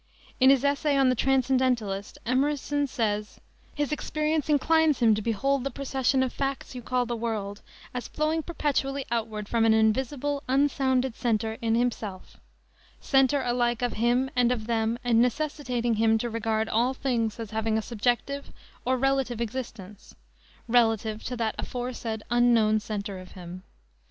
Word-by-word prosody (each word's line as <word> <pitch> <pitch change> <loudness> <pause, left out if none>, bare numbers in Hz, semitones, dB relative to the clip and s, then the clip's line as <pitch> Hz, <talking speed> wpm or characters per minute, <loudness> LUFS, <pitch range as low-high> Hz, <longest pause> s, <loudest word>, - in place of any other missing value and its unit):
In 260 0 +6
his 270 -1 +5
essay 285 0 +2
on 270 -1 +4
the 255 - +2
Transcendentalist, 255 -6 +1
Emerson 285 +3 0
says: 210 -5 -2 0.4
"His 290 -1 -1
experience 305 0 -1
inclines 310 +1 +3
him 230 -3 +4
to 210 - -1
behold 250 +5 0
the 275 - -1
procession 265 -1 0
of 255 - -3
facts 275 -1 -3
you 250 - -6
call 250 +1 0
the 240 0 -3
world 215 -3 -3 0.3
as 250 -1 -4
flowing 310 +1 0
perpetually 280 -4 -1
outward 220 -3 -2
from 230 0 +1
an 225 -1 +5
invisible, 265 +6 +1
unsounded 265 -2 +1
center 220 -1 -1
in 225 -1 +1
himself; 225 -5 -3 0.6
center 270 0 +3
alike 240 -1 0
of 245 - 0
him 245 +4 +1
and 245 -1 +3
of 225 -3 -2
them 225 0 0
and 235 -2 +3
necessitating 250 -2 0
him 225 0 +4
to 235 +1 -3
regard 220 -1 -1
all 240 +5 +1
things 235 -5 -1
as 225 -3 -6
having 220 0 0
a - - 0
subjective 245 +5 -1 0.3
or 260 +1 +1
relative 270 -2 0
existence 220 -4 -6 0.5
relative 225 -2 +2
to 250 - -4
that 225 -2 -1
aforesaid 240 -3 -4
Unknown 235 -3 +4
Center 205 -2 -5
of 185 0 -12
him. 180 0 -9
245 Hz, 155 wpm, -27 LUFS, 220-270 Hz, 0.6 s, In